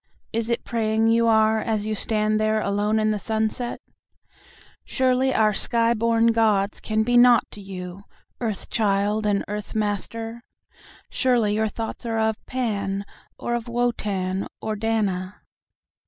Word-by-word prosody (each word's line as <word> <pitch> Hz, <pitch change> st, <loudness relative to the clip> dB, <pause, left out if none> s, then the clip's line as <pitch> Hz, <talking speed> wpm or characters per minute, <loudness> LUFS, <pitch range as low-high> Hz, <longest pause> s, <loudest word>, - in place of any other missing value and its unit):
"Is 230 Hz, 0 st, -1 dB
it 235 Hz, 0 st, -1 dB
praying 225 Hz, -1 st, +1 dB
you 230 Hz, 0 st, +3 dB
are 220 Hz, 0 st, +4 dB
as 215 Hz, -1 st, -1 dB
you 215 Hz, -, -1 dB
stand 215 Hz, 0 st, +1 dB
there 215 Hz, 0 st, +2 dB
alone 205 Hz, +1 st, 0 dB
in 215 Hz, 0 st, +2 dB
the 210 Hz, -, -1 dB
sunset?"Surely 250 Hz, +3 st, -3 dB
our 215 Hz, -3 st, +3 dB
sky 230 Hz, +3 st, +2 dB
born 230 Hz, 0 st, +3 dB
gods 215 Hz, -3 st, +2 dB
can 220 Hz, 0 st, 0 dB
be 245 Hz, +2 st, +2 dB
naught 240 Hz, -2 st, +7 dB
to 205 Hz, -, -10 dB
you, 190 Hz, 0 st, -8 dB, 0.3 s
earth 220 Hz, -5 st, -4 dB
child 210 Hz, 0 st, +1 dB
and 200 Hz, -1 st, +1 dB
earth 210 Hz, +1 st, -6 dB
master?"Surely 225 Hz, +2 st, -3 dB
your 220 Hz, +1 st, +1 dB
thoughts 225 Hz, +1 st, -5 dB
are 225 Hz, -1 st, -1 dB
of 220 Hz, -1 st, 0 dB
Pan, 200 Hz, -6 st, -2 dB, 0.3 s
or 240 Hz, -, -3 dB
of 240 Hz, 0 st, -2 dB
Wotan, 205 Hz, -6 st, -1 dB
or 220 Hz, 0 st, -3 dB
Dana? 205 Hz, -3 st, -2 dB
220 Hz, 140 wpm, -24 LUFS, 205-230 Hz, 0.3 s, naught